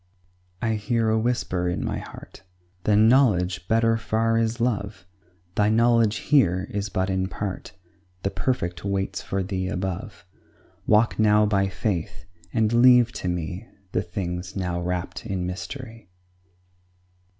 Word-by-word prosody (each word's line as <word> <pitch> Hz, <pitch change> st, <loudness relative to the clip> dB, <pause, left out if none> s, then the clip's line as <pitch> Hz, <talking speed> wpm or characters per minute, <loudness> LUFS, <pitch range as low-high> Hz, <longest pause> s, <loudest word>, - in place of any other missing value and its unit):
I 110 Hz, -1 st, +1 dB
hear 115 Hz, +1 st, 0 dB
a 110 Hz, -, +2 dB
whisper 100 Hz, -7 st, -1 dB
in 90 Hz, -, -2 dB
my -, -, -2 dB
heart -, -, -11 dB, 0.4 s
"Than 105 Hz, +1 st, +5 dB
knowledge, 90 Hz, -9 st, +3 dB
better 115 Hz, 0 st, +3 dB
far 115 Hz, +1 st, 0 dB
is 115 Hz, +1 st, -1 dB
love; 100 Hz, -5 st, -2 dB, 0.5 s
Thy 105 Hz, +1 st, +2 dB
knowledge 115 Hz, -1 st, +3 dB
here 100 Hz, -, +2 dB
is 100 Hz, 0 st, -3 dB
but 95 Hz, -2 st, -1 dB
in 95 Hz, 0 st, 0 dB
part, 95 Hz, 0 st, -5 dB, 0.5 s
The 95 Hz, -, 0 dB
perfect 90 Hz, -10 st, -2 dB
waits 100 Hz, -1 st, -2 dB
for 95 Hz, 0 st, -2 dB
Thee 95 Hz, 0 st, -3 dB
above: 95 Hz, 0 st, -4 dB, 0.6 s
Walk 110 Hz, +2 st, +3 dB
now 105 Hz, 0 st, +5 dB
by 100 Hz, -2 st, +2 dB
faith, 95 Hz, -3 st, -3 dB, 0.3 s
and 110 Hz, 0 st, +1 dB
leave 120 Hz, 0 st, +6 dB
to 90 Hz, -, -5 dB
me 90 Hz, +4 st, -3 dB, 0.2 s
The 90 Hz, -, 0 dB
things 90 Hz, 0 st, -5 dB
now 90 Hz, -2 st, -2 dB
wrap'd 90 Hz, +4 st, -4 dB
in 95 Hz, -4 st, -2 dB
mystery." 115 Hz, +4 st, -7 dB
100 Hz, 140 wpm, -24 LUFS, 90-115 Hz, 0.6 s, leave